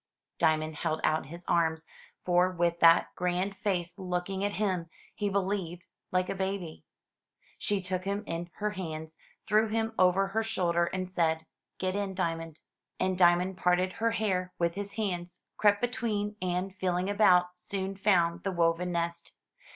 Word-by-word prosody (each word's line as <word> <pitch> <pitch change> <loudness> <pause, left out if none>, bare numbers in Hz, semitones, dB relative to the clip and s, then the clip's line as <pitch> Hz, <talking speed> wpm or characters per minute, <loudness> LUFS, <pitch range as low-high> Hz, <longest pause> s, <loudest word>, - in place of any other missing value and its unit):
Diamond 155 -1 +2
held 155 +1 -1
out 155 -2 +1
his 170 +3 -9
arms, 160 -1 +1 0.4
for 180 0 +4
with 170 -1 0
that 165 0 +6
grand 180 +2 -1
face 180 -3 -2
looking 185 +1 -2
at 205 0 0
him, 185 -5 -1 0.2
he 205 -1 -1
believed 190 -3 -2 0.3
like 185 0 +1
a - - -2
baby. 190 -4 -4 0.8
She 205 -2 0
took 185 0 -2
him 200 +2 -1
in 170 0 -4
her 210 0 -1
hands, 160 -5 -6 0.3
threw 220 0 +3
him 225 +1 -1
over 185 +1 +4
her 220 +3 0
shoulder, 175 -6 +1
and 185 +1 -3
said, 160 -3 0 0.3
"Get 185 0 -1
in. 200 -2 -2
Diamond." 165 -3 -3 0.4
And 185 0 +1
Diamond 180 +1 +4
parted 180 +1 +2
her 230 - +4
hair 185 -5 0
with 170 -1 +1
his 200 +2 -5
hands, 180 -4 -3
crept 205 -1 +3
between, 215 -4 -1
and, 185 +1 -1
feeling 185 -1 0
about, 185 -4 +5
soon 195 0 -3
found 175 -4 +2
the 195 - -2
woven 170 0 +1
nest. 170 0 -2
185 Hz, 160 wpm, -30 LUFS, 170-200 Hz, 0.8 s, that